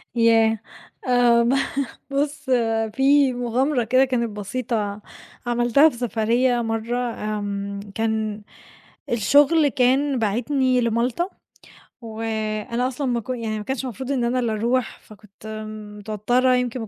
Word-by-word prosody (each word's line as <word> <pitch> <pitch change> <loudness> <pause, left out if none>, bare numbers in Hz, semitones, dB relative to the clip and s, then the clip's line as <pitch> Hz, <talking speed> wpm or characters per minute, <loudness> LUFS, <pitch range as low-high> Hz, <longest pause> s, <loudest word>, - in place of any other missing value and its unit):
ياه! 225 -1 +4 0.5
آمم. 245 0 +4 0.6
ب - - -7
بُص 290 -1 -2 0.4
في 275 0 +4
مغامرة 245 +2 0
كده 255 +4 +4
كانت 235 -3 -1
بسيطة 210 0 -3 0.5
عملتها 240 +5 +4
في 245 - -7
سفريّة 240 +1 +1
مَرّة، 225 +1 -2
آمم، 205 -4 -3
كان 220 -1 -2 0.7
الشغل 290 +7 +4
كان 270 +1 +2
باعتني 250 +4 +1
لمالطا، 235 - 0 0.7
وأنا 225 +1 -3
أصلًا 265 +2 -3
ما 240 -1 0
ك 220 - -17
يعني 230 -4 -2
ما 210 - -6
كانش 265 0 -3
مفروض 260 +2 -5
إن 260 -3 0
أنا 240 +2 +1
اللي 235 -3 0
أروح، 235 +3 -1
فكنت 210 0 -15 0.5
متوترة 240 +5 +1
يمكن 250 0 -1
ما 225 - -5
240 Hz, 125 wpm, -22 LUFS, 220-255 Hz, 0.7 s, ياه